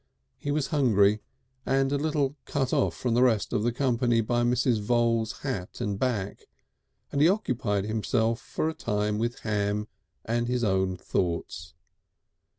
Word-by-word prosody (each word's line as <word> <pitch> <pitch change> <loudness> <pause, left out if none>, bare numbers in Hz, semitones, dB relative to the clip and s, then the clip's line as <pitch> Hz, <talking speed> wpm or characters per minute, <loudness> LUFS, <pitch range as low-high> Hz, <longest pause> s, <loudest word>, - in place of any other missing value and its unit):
He 145 - -5
was 145 -1 0
hungry, 105 -7 +4 0.4
and 135 +1 +1
a - - +2
little 145 -2 0
cut 135 -1 -1
off 140 - +2
from 125 -2 -1
the 120 - +3
rest 115 -5 +2
of - - +1
the 120 +2 +1
company 120 -2 +1
by 120 +2 0
Mrs. 120 -1 +2
Voules' 115 0 +1
hat 105 -11 -4
and 100 -1 -2
back, 110 -7 -2 0.6
and 140 - 0
he 160 - +7
occupied 120 - 0
himself 115 +1 0
for - - -2
a 160 - -1
time 105 -5 -1
with 120 +1 -2
ham 105 0 -1 0.4
and 120 +1 0
his 125 0 0
own 95 -3 +1
thoughts. 85 -2 -3
115 Hz, 155 wpm, -27 LUFS, 105-130 Hz, 0.6 s, he